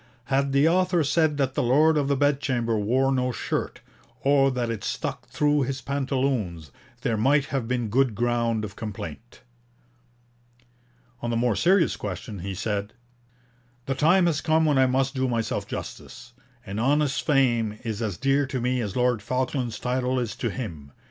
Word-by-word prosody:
Had 140 0 +2
the 140 +3 +4
author 180 0 +2
said 150 +1 +2
that 135 -2 0
the - - 0
Lord 150 +6 +4
of 145 -2 +1
the 140 - +2
Bedchamber 130 -5 +1
wore 125 +6 +1
no 125 -1 +1
shirt, - - -3 0.4
or 135 0 +4
that 125 -3 -2
it 110 -3 -5
stuck - - -4
through 150 0 +1
his 135 +1 -2
pantaloons, 130 - -2 0.3
there 115 -4 0
might 140 +6 +3
have 130 -4 -1
been 120 -2 -1
good 125 +1 +2
ground 115 -1 0
of 100 -1 -9
complaint.' 105 0 -8 1.8
On 120 - -2
the 115 - 0
more 120 -2 +1
serious 180 - +3
question 100 +1 -6
he 95 +2 -5
said: 100 +1 -3 0.9
'The 135 - -1
time 170 +7 +4
has 160 -3 +1
come 160 0 +2
when 145 -3 +3
I 130 - +5
must 135 +2 +1
do 130 -1 0
myself 115 -2 -2
justice. - - -8 0.3
An 100 +2 -5
honest 140 +3 +1
fame 120 -7 +2
is 110 -2 -4
as 105 -5 -2
dear 135 +1 +1
to 130 -1 -3
me 125 +1 0
as 105 -4 -4
Lord 125 -3 +1
Falkland's 125 0 -2
title 125 +1 -1
is 120 -3 -3
to - - -1
him. 80 - -7
130 Hz, 170 wpm, -25 LUFS, 115-140 Hz, 1.8 s, I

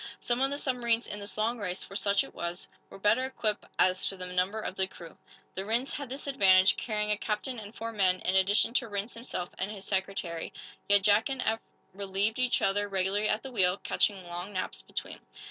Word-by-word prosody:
Some 240 +1 -1
of 270 - +4
the 285 - -2
submarines 240 -4 +1
in 205 - -5
this 200 -1 -5
long 225 +3 0
race 185 -3 -3
for 195 - -11
such 200 -1 +2
it - - -11
was 170 +1 -4 0.2
were - - -10
better 210 +6 +3
equipped 225 -5 -2
as 185 0 +3
to 195 - -2
the 185 - -4
number 180 +4 0
of 200 - -4
the 190 -1 +1
crew. 170 -3 -12 0.4
The 190 - -3
Rhinds 230 +6 0
had 285 -3 -5
this 270 +3 -5
advantage, 195 -9 +6
carrying 210 -2 0
a 210 - +3
captain 225 +3 -2
and 210 +1 -10
four 230 +1 -4
men, 190 -4 +3
in 185 - 0
addition 200 +4 +3
to 245 -2 +1
Rhinds 205 +2 -3
himself 230 -6 -5
and 190 - -1
his 200 -2 -7
secretary. 190 -4 -2 0.4
Yet 205 -1 +5
Jack 210 +5 +4
and 270 -1 -2
Eph 220 0 +1 0.3
relieved 200 +3 -1
each 255 -1 +2
other 205 +1 +2
regularly 195 +2 +1
at 215 - 0
the 265 - -7
wheel, 190 -5 +2
catching 195 -3 0
long 175 +3 -5
naps 125 - -3
between. 65 - -6
205 Hz, 215 wpm, -30 LUFS, 190-230 Hz, 0.4 s, advantage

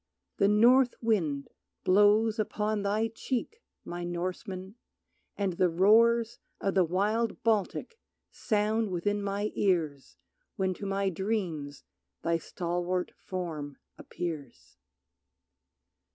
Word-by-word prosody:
The 195 - +4
North 240 +5 +5
wind 165 - 0 0.4
blows 210 +3 +4
Upon 210 0 -1
thy 210 +3 0
cheek, 260 - -4 0.2
my 175 0 -5
Norseman, 185 +2 -4 0.6
and 195 -3 0
the 180 +1 +2
roars 225 +6 +4 0.2
Of 195 - 0
the 190 - +4
wild 205 +6 0
Baltic 225 - 0 0.3
sound 215 +1 0
within 205 +3 -1
my 200 +1 -2
ears 160 -8 0 0.4
When 190 -3 0
to 200 +3 -6
my 195 0 0
dreams 175 -7 -3 0.4
thy 165 0 +1
stalwart 175 +2 -2
form 160 -7 -5 0.2
appears. 155 - -7
195 Hz, 105 wpm, -29 LUFS, 175-215 Hz, 0.6 s, North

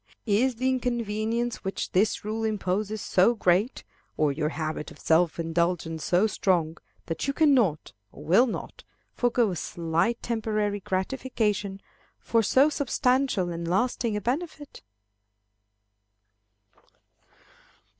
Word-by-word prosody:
Is 240 +4 +2
the 255 +3 -1
inconvenience 235 -2 -1
which 195 0 -3
this 205 +3 +1
rule 220 +1 -2
imposes 210 0 -1
so 190 +6 +3
great, 200 +4 +1 0.3
or 150 -2 +2
your 150 +2 -1
habit 155 -1 -4
of - - -14
self 165 0 +2
indulgence 165 -1 -1
so 180 +4 +3
strong, 170 -6 0 0.3
that 165 +10 -3
you 275 - 0
cannot, 255 - +2 0.2
or - - -12
will 195 +11 +5
not, 230 - -6 0.3
forego 240 -3 +1
a - - -3
slight 170 +8 -1
temporary 215 -3 -1
gratification 205 0 -2 0.4
for 230 - +1
so 260 +6 +4
substantial 255 -8 +1
and 170 0 -4
lasting 230 +3 0
a - - -3
benefit? 290 - -4
210 Hz, 115 wpm, -26 LUFS, 175-240 Hz, 0.4 s, will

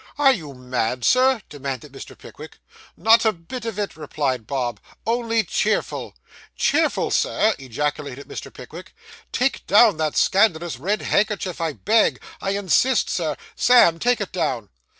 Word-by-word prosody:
'Are 275 -2 +5
you 150 - -7
mad, 125 -1 -2
sir?' 255 -3 +3
demanded 135 -3 -6
Mr. - - -11
Pickwick. - - -12 0.4
'Not 225 +1 +5
a 220 - +4
bit 215 +7 -9
of 225 -3 -4
it,' 205 -1 -3
replied 140 -6 -3
Bob; 120 -6 -2 0.3
'only 230 0 +1
cheerful.' 215 +3 -2 0.4
'Cheerful, - - +1
sir!' 220 +1 +2
ejaculated 140 +1 -4
Mr. - - -8
Pickwick. - - -12 0.4
'Take 265 +2 -1
down 210 -2 +5
that 155 -1 -1
scandalous 175 - +2
red 200 +9 -1
handkerchief, 200 -4 0
I 165 -2 -1
beg. 220 +8 +2 0.2
I 195 +1 -1
insist, 205 +5 +2
Sir. 155 -6 -2 0.2
Sam, 205 -10 +5
take 245 +2 +2
it 205 - -4
down. 150 - -2
185 Hz, 145 wpm, -22 LUFS, 145-225 Hz, 0.4 s, Are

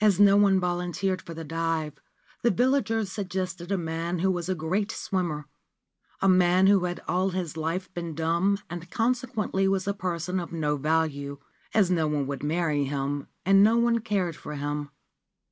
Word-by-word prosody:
As 205 -3 +4
no 200 -1 +7
one 200 -2 +5
volunteered 180 +1 -1
for 165 - -9
the 165 - -6
dive, 165 -1 -2 0.4
the 240 - +3
villagers 225 -3 +1
suggested 185 -2 -4
a 195 - +2
man 165 +1 -2
who 190 +3 +2
was 175 0 -3
a 185 - +1
great 185 +7 -1
swimmer 170 -9 -2 0.4
— - - -38
a - - +4
man 185 0 +5
who 195 -2 +5
had 175 0 -3
all 185 +2 +1
his 180 -5 -3
life 165 +3 -3
been 170 -2 -5
dumb 170 +5 +1
and 175 0 -7
consequently 225 -4 0
was 195 0 0
a 200 - +1
person 180 -1 -2
of 170 - -6
no 150 -3 0
value, 145 -1 -1 0.4
as 195 -4 +4
no 165 -3 +2
one 150 -2 0
would 140 0 -4
marry 150 -2 0
him 140 +1 -2 0.2
and 195 +1 +6
no 220 +3 +5
one 235 0 +3
cared 195 -7 -1
for 150 - -7
him. 145 0 -3
175 Hz, 180 wpm, -27 LUFS, 160-195 Hz, 0.4 s, no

